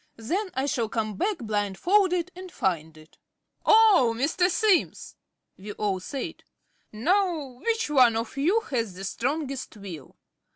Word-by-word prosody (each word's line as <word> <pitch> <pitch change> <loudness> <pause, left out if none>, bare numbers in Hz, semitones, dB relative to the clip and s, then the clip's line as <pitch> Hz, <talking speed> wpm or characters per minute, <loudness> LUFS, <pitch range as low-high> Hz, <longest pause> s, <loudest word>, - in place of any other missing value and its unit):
Then 365 - -2
I 265 +1 0
shall 235 -6 -1
come 215 -2 -2
back 405 - -1
blindfolded 330 - +1
and 370 0 -9
find 160 - -2
it." 155 0 -19 0.4
"Oh, 405 - +5
Mr. 320 +8 +2
Simms!" 385 0 +1 0.4
we 205 +2 -7
all 200 -3 -1
said. 275 - -6 0.5
"Now, 305 - 0
which 460 0 0
one 255 -6 +5
of 230 +2 -4
you 350 +11 +2
has 230 - -3
the 190 - -8
strongest 270 +4 -3
will?" 175 -9 -10
265 Hz, 135 wpm, -26 LUFS, -, 0.5 s, Oh